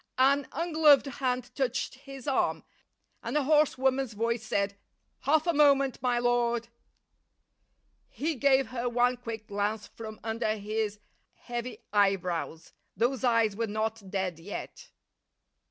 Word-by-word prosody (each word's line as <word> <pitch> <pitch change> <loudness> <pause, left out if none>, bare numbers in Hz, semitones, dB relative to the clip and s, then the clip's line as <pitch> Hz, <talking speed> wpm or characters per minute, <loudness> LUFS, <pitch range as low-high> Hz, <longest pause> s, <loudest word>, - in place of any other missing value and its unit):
An 275 +1 +4
ungloved 310 -3 +4
hand 255 -2 -2
touched 260 -1 -1
his 270 0 -11
arm, 275 - +1 0.6
and - - -2
a 295 - +2
hoarse 300 0 +3
woman's 265 -2 +1
voice 230 +1 -1
said, 200 -2 -1 0.4
"Half 305 +4 +2
a 340 - +2
moment, 275 -4 +4
my 245 -1 +1
lord." 240 -1 +1 1.4
He 320 +3 -2
gave 270 -2 +3
her 245 -1 -2
one 245 +1 +2
quick 225 -3 -6
glance 205 +1 -2
from 220 -1 -9
under 220 -1 -1
his 210 0 -2 0.4
heavy 240 0 -6
eyebrows. 180 -5 0 0.2
Those 255 +3 0
eyes 230 -4 +3
were 230 +1 -1
not 215 -1 -3
dead 185 -4 -2
yet. 205 - -8
240 Hz, 130 wpm, -29 LUFS, 215-270 Hz, 1.4 s, An